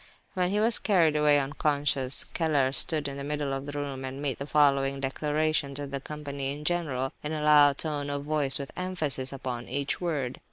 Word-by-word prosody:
When 180 Hz, -2 st, 0 dB
he 205 Hz, +2 st, 0 dB
was 225 Hz, +1 st, +3 dB
carried 170 Hz, -7 st, +3 dB
away 150 Hz, -1 st, +5 dB
unconscious, 140 Hz, -1 st, 0 dB
Keller 145 Hz, -6 st, +1 dB
stood 150 Hz, +1 st, +3 dB
in 140 Hz, 0 st, -6 dB
the 140 Hz, -, -5 dB
middle 145 Hz, -1 st, -2 dB
of 135 Hz, +1 st, -4 dB
the -, -, -4 dB
room, 140 Hz, -2 st, -5 dB
and 130 Hz, +1 st, -6 dB
made 140 Hz, -4 st, -2 dB
the 140 Hz, -, -5 dB
following 140 Hz, -2 st, +3 dB
declaration 150 Hz, +1 st, 0 dB
to 145 Hz, +1 st, -4 dB
the 140 Hz, -1 st, -5 dB
company 140 Hz, -2 st, -5 dB
in 150 Hz, +2 st, -7 dB
general, 145 Hz, -7 st, -1 dB
in 150 Hz, +1 st, -4 dB
a 155 Hz, -1 st, -3 dB
loud 145 Hz, -2 st, +6 dB
tone 145 Hz, -3 st, -2 dB
of 140 Hz, 0 st, -3 dB
voice, 145 Hz, -3 st, +2 dB
with 140 Hz, -1 st, -6 dB
emphasis 160 Hz, -8 st, -1 dB
upon 125 Hz, -3 st, -5 dB
each 140 Hz, +5 st, -1 dB
word. 145 Hz, -8 st, -2 dB
145 Hz, 200 wpm, -28 LUFS, 135-150 Hz, -, loud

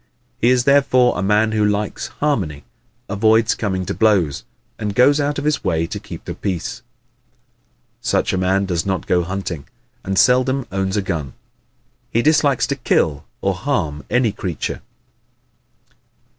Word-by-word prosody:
He 120 Hz, -, +3 dB
is 125 Hz, -1 st, +3 dB
therefore 130 Hz, -2 st, +4 dB
a 90 Hz, -, -2 dB
man 105 Hz, +3 st, +2 dB
who 110 Hz, -1 st, +1 dB
likes 105 Hz, 0 st, -1 dB
harmony, 95 Hz, -, -2 dB, 0.4 s
avoids 110 Hz, +2 st, +3 dB
coming 95 Hz, -4 st, -2 dB
to -, -, -3 dB
blows, 95 Hz, -10 st, +2 dB, 0.4 s
and 105 Hz, -2 st, -3 dB
goes 140 Hz, +4 st, +5 dB
out 145 Hz, 0 st, -1 dB
of 145 Hz, -, -3 dB
his 150 Hz, -2 st, 0 dB
way 85 Hz, -4 st, 0 dB
to -, -, -5 dB
keep -, -, -10 dB
the -, -, -4 dB
peace. 90 Hz, -4 st, -4 dB, 1.2 s
Such -, -, 0 dB
a -, -, +1 dB
man 95 Hz, +2 st, +1 dB
does 85 Hz, -4 st, -1 dB
not 95 Hz, -3 st, -2 dB
go 90 Hz, -1 st, +2 dB
hunting 90 Hz, -4 st, -5 dB, 0.4 s
and 95 Hz, 0 st, -2 dB
seldom 130 Hz, +2 st, +3 dB
owns 95 Hz, +1 st, -1 dB
a 100 Hz, -, 0 dB
gun. 80 Hz, -8 st, -3 dB, 0.8 s
He 115 Hz, -, +1 dB
dislikes 145 Hz, -3 st, +3 dB
to 140 Hz, -, -2 dB
kill 75 Hz, -, 0 dB, 0.2 s
or -, -, +1 dB
harm 75 Hz, -1 st, -2 dB
any 125 Hz, -3 st, +2 dB
creature. 95 Hz, -5 st, -4 dB
105 Hz, 155 wpm, -20 LUFS, 90-125 Hz, 1.2 s, goes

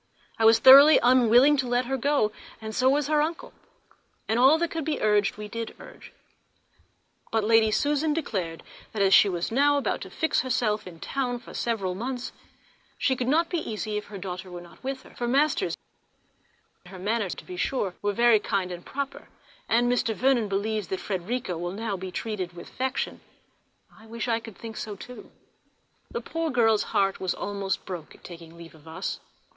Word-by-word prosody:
I 225 Hz, -, +3 dB
was 225 Hz, 0 st, +7 dB
thoroughly 275 Hz, +5 st, +9 dB
unwilling 250 Hz, +3 st, +5 dB
to 260 Hz, -2 st, -1 dB
let 245 Hz, +1 st, +1 dB
her 270 Hz, +2 st, -1 dB
go, 275 Hz, -4 st, +1 dB, 0.3 s
and 220 Hz, -1 st, -7 dB
so 255 Hz, +4 st, +3 dB
was 290 Hz, +1 st, +2 dB
her 300 Hz, +1 st, +2 dB
uncle; 325 Hz, +2 st, -3 dB, 0.7 s
and 225 Hz, +2 st, +1 dB
all 270 Hz, +5 st, +6 dB
that 340 Hz, 0 st, -1 dB
could 325 Hz, -1 st, -3 dB
be 300 Hz, -1 st, -2 dB
urged 210 Hz, -2 st, +2 dB
we 210 Hz, 0 st, -6 dB
did 230 Hz, +2 st, -6 dB
urge; -, -, -13 dB, 1.2 s
but 225 Hz, -1 st, +1 dB
Lady 225 Hz, 0 st, +4 dB
Susan 295 Hz, +7 st, +1 dB
declared 190 Hz, -, -3 dB, 0.3 s
that 210 Hz, -2 st, +1 dB
as 195 Hz, 0 st, +4 dB
she 205 Hz, -, +7 dB
was 175 Hz, +1 st, -3 dB
now 285 Hz, +4 st, +3 dB
about 280 Hz, -, -1 dB
to -, -, -7 dB
fix 320 Hz, -, 0 dB
herself 220 Hz, -5 st, -1 dB
in 170 Hz, -2 st, -11 dB, 0.2 s
London 250 Hz, -3 st, 0 dB
for 240 Hz, -, -13 dB
several 205 Hz, -6 st, -2 dB
months, 245 Hz, +5 st, -4 dB, 0.7 s
she 265 Hz, -, +1 dB
could 250 Hz, -1 st, -3 dB
not 325 Hz, +5 st, +3 dB
be 350 Hz, -, -1 dB
easy 215 Hz, -4 st, -4 dB
if 210 Hz, -, -3 dB
her 205 Hz, -, -9 dB
daughter 185 Hz, 0 st, -6 dB
were 175 Hz, -1 st, -7 dB
not 175 Hz, +6 st, -16 dB
with 265 Hz, 0 st, -4 dB
her -, -, -16 dB
for 240 Hz, -, -4 dB
masters, 280 Hz, +5 st, +1 dB
&c. 180 Hz, -, -28 dB
Her 190 Hz, -, -10 dB
manner, 205 Hz, +2 st, -1 dB
to -, -, -7 dB
be 180 Hz, -, -8 dB
sure, 195 Hz, 0 st, -1 dB
was 205 Hz, 0 st, -1 dB
very 235 Hz, -2 st, +5 dB
kind 190 Hz, -3 st, -2 dB
and 175 Hz, 0 st, -7 dB
proper, 280 Hz, 0 st, -5 dB, 0.4 s
and 240 Hz, +2 st, +3 dB
Mr. 245 Hz, -2 st, +1 dB
Vernon 255 Hz, -3 st, +2 dB
believes 205 Hz, +1 st, -2 dB
that 190 Hz, -, -3 dB
Frederica 190 Hz, -1 st, -3 dB
will 175 Hz, +1 st, -4 dB
now 215 Hz, 0 st, -3 dB
be 185 Hz, 0 st, -6 dB
treated 185 Hz, -2 st, -4 dB
with 175 Hz, 0 st, -11 dB
affection. 260 Hz, +1 st, -3 dB, 0.7 s
I 220 Hz, 0 st, -17 dB
wish 230 Hz, +2 st, -5 dB
I 230 Hz, -1 st, +1 dB
could 225 Hz, -3 st, -12 dB
think 225 Hz, -1 st, -8 dB
so 210 Hz, -2 st, -5 dB
too. 250 Hz, +5 st, -11 dB, 0.8 s
The -, -, -4 dB
poor 330 Hz, 0 st, -3 dB
girl's 225 Hz, -5 st, +3 dB
heart 195 Hz, -1 st, +1 dB
was 185 Hz, -1 st, -1 dB
almost 200 Hz, -1 st, -3 dB
broke 175 Hz, -5 st, -7 dB
at -, -, -22 dB
taking 170 Hz, -1 st, -11 dB
leave 170 Hz, -1 st, -12 dB
of 160 Hz, 0 st, -19 dB
us. 160 Hz, -, -4 dB
225 Hz, 195 wpm, -26 LUFS, 195-260 Hz, 1.2 s, thoroughly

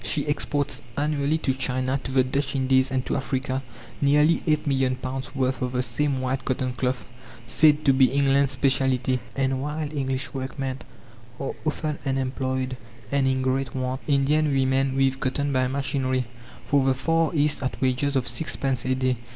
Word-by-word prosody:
She 150 Hz, -, 0 dB
exports 145 Hz, -2 st, -1 dB, 0.2 s
annually 150 Hz, +1 st, +1 dB
to 135 Hz, -4 st, 0 dB
China, 130 Hz, +1 st, -1 dB
to 130 Hz, -, -3 dB
the 130 Hz, -1 st, +4 dB
Dutch 140 Hz, +2 st, -2 dB
Indies, 130 Hz, 0 st, +3 dB
and 130 Hz, -1 st, -1 dB
to -, -, -1 dB
Africa, 135 Hz, -1 st, -2 dB, 0.4 s
nearly 150 Hz, +3 st, +4 dB
eight 150 Hz, -1 st, +2 dB
million 135 Hz, -2 st, +1 dB
pounds' 130 Hz, +1 st, -5 dB
worth 130 Hz, -2 st, 0 dB
of 125 Hz, 0 st, -2 dB
the 125 Hz, 0 st, +1 dB
same 135 Hz, +3 st, 0 dB
white 130 Hz, +1 st, -1 dB
cotton 130 Hz, -1 st, -1 dB
cloth, 125 Hz, +1 st, -2 dB, 0.4 s
said 150 Hz, +6 st, +4 dB
to 135 Hz, -, +6 dB
be 130 Hz, 0 st, +6 dB
England's 140 Hz, 0 st, +2 dB
specialty. 130 Hz, -1 st, +1 dB, 0.2 s
And 135 Hz, -1 st, 0 dB
while 150 Hz, +1 st, -3 dB
English 135 Hz, -2 st, -2 dB
workmen 135 Hz, 0 st, -4 dB, 0.6 s
are 135 Hz, -, -3 dB
often 155 Hz, 0 st, -2 dB
unemployed 130 Hz, -1 st, -1 dB, 0.3 s
and 140 Hz, -1 st, +2 dB
in 130 Hz, 0 st, +1 dB
great 130 Hz, 0 st, -1 dB
want, 130 Hz, 0 st, -2 dB
Indian 145 Hz, +2 st, +3 dB
women 135 Hz, 0 st, +2 dB
weave 135 Hz, 0 st, +2 dB
cotton 140 Hz, +2 st, -1 dB
by 130 Hz, -1 st, +2 dB
machinery, 130 Hz, -1 st, -1 dB, 0.4 s
for 140 Hz, -2 st, +3 dB
the 130 Hz, 0 st, +2 dB
Far 165 Hz, +4 st, +1 dB
East 150 Hz, -1 st, +2 dB
at 130 Hz, -, -3 dB
wages 130 Hz, +2 st, +1 dB
of 130 Hz, -2 st, +1 dB
six 160 Hz, -, -2 dB
pence 130 Hz, -3 st, -1 dB
a 130 Hz, 0 st, +1 dB
day. 130 Hz, -1 st, 0 dB
135 Hz, 175 wpm, -25 LUFS, 130-140 Hz, 0.6 s, to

